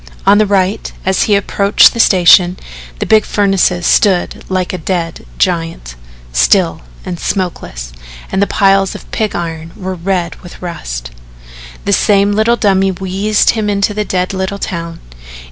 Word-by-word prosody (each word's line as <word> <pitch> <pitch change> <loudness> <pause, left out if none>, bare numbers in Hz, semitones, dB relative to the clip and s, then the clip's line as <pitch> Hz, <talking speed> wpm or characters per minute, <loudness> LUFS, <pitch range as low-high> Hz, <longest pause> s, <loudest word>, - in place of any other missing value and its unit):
On 200 +1 +5
the 215 - +3
right, 195 0 0
as 190 -1 +1
he 205 - +4
approached 200 0 +4
the 230 - -6
station, 180 -2 +5 0.4
the - - -3
big 220 -1 +4
furnace 195 -2 +2 0.2
stood 190 -4 +2
like 185 -1 -1
a 185 - -4
dead 165 0 -4
giant, 165 - -2 0.4
still 165 - +2 0.2
and 180 -2 -5
smokeless, - - -4 0.4
and 190 - 0
the 200 - +2
piles 195 -1 +2
of - - -12
pig 215 -2 -2
iron 165 -1 -5
were 190 0 -5
red 180 -1 -2
with 175 - -12
rust. 60 - -6 0.7
The 200 - +1
same 200 0 +3
little 220 +3 +2
dummy 195 -4 +2
wheezed 195 +3 +1
him 215 -2 -2
into 200 0 0
the 210 +1 -1
dead 185 -2 -2
little 190 +1 -3
town. 170 -4 -5
190 Hz, 155 wpm, -14 LUFS, 175-200 Hz, 0.7 s, On